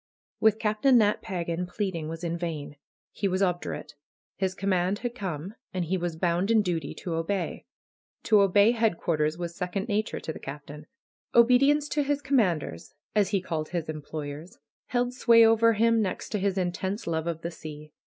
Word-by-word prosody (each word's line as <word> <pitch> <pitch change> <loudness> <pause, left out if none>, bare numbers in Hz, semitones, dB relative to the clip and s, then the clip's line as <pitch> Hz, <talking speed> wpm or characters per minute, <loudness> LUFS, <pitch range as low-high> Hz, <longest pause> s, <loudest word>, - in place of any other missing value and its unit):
With 220 -1 +4
Captain 220 +4 +3
Nat 210 -2 +3
Pagan 175 -3 -3
pleading 180 -4 -3
was 165 +1 -7
in 170 -1 -1
vain. 160 -4 -5 0.4
He 200 - -1
was 190 +1 +1
obdurate. 175 -4 -2 0.4
His 190 -1 -1
command 190 0 0
had 240 - -1
come, 185 -4 -5 0.2
and 180 -2 0
he 180 +4 0
was 175 -2 -2
bound 175 +3 0
in 225 -2 +4
duty 165 -6 -2
to 175 - -5
obey. 165 +2 -2 0.6
To 215 -3 +5
obey 200 +3 +5
headquarters 170 -9 0
was 170 -1 -5
second 190 +4 -3
na 210 +1 +3
ture - - -6
to 160 - -5
the - - -9
Captain. 150 +2 -9 0.5
Obedience 275 +5 +5
to 295 - +1
his 290 0 -1
commanders, 185 - 0 0.2
as 205 -3 +2
he 200 -3 +1
called 160 -4 -3
his 170 -3 -3
employers, 155 +4 -6 0.3
held 245 0 0
sway 230 -2 +6
over 225 +1 +5
him 230 +1 +3
next 190 -3 -3
to 210 - -1
his 195 0 0
intense 190 +3 -2
love 160 -1 -2
of 165 -1 -3
the 170 - -3
sea. 150 -2 -10
185 Hz, 180 wpm, -27 LUFS, 165-215 Hz, 0.6 s, sway